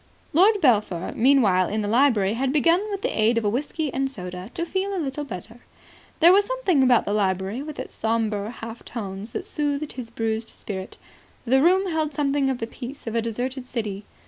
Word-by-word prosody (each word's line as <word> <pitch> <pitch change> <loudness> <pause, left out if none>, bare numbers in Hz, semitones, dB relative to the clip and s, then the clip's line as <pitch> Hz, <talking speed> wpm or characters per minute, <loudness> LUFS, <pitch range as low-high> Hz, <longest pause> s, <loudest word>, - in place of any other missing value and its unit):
Lord 405 +7 +5
Belpher, 210 - +2
meanwhile, 225 -8 +4
in 215 +1 -1
the - - -2
library, 225 -4 +3
had 260 +3 0
begun 330 +5 +3
with 400 0 -4
the - - -1
aid 225 +2 +3
of 230 - 0
a - - +3
whisky 290 +5 -2
and 270 0 0
soda 180 -5 -7
to 340 - -2
feel 390 +2 -2
a - - -2
little 295 -3 -3
better. 225 -1 -8 0.6
There 340 +3 +8
was 405 +1 +5
something 410 - +1
about 250 -2 +4
the 205 - -1
library 195 +3 0
with 300 0 -7
its - - -7
sombre 220 -2 -1
half 230 0 -8
tones 200 -2 -6
that - - -5
soothed 290 0 -2
his 245 -3 -7
bruised 225 -1 -2
spirit. 190 -2 -7 0.5
The 265 +3 +4
room 370 +3 +3
held 310 -2 -1
something 280 -1 +1
of 265 - -1
the 225 - -3
peace 255 +4 -9
of 225 - -4
a 230 - +1
deserted 250 +3 -4
city. 210 -5 -4
245 Hz, 200 wpm, -24 LUFS, 215-295 Hz, 0.6 s, There